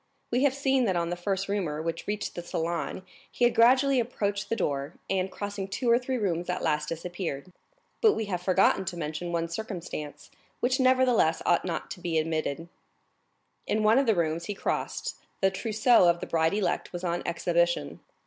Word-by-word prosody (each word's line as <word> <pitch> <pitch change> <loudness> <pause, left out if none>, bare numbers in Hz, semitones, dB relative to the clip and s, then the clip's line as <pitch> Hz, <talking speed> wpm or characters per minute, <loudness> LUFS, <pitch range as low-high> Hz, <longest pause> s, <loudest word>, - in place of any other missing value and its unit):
We 245 +2 +2
have 270 -2 +2
seen 270 -2 +2
that 190 -4 +1
on 170 0 0
the - - -1
first 190 +2 -2
rumor 185 -7 -2
which 165 +1 -4
reached 210 0 -3
the 175 - -5
salon 170 +2 -3 0.3
he 245 - +1
had 240 - +3
gradually 255 +3 +5
approached 205 -4 -2
the 230 - +1
door, 140 -4 -2 0.2
and 190 0 0
crossing 200 -1 -4
two 235 +5 0
or 235 - +5
three 255 0 -2
rooms 180 -5 -1
at 180 - -2
last 150 -2 0
disappeared. 175 -1 -5 0.5
But 440 -2 +6
we 220 - -2
have 180 -4 -3
forgotten 190 +1 +3
to 175 -1 -4
mention 160 +2 -4
one 170 -1 -1
circumstance, 170 -6 -6 0.3
which 255 +2 +1
nevertheless 255 -10 +3
ought 175 - +3
not 170 -3 -4
to - - -6
be 170 -2 0
omitted; 160 0 -2 1.0
in 215 0 +1
one 220 +4 +5
of 275 - +1
the 220 - +4
rooms 165 0 0
he 205 - -4
crossed, - - -3 0.2
the 195 0 +3
trousseau 215 -1 +4
of 170 0 +2
the - - -4
bride 165 +2 +1
elect 210 -2 -1
was 175 0 -6
on 175 -1 -1
exhibition. 170 - 0
185 Hz, 190 wpm, -28 LUFS, 170-220 Hz, 1.0 s, But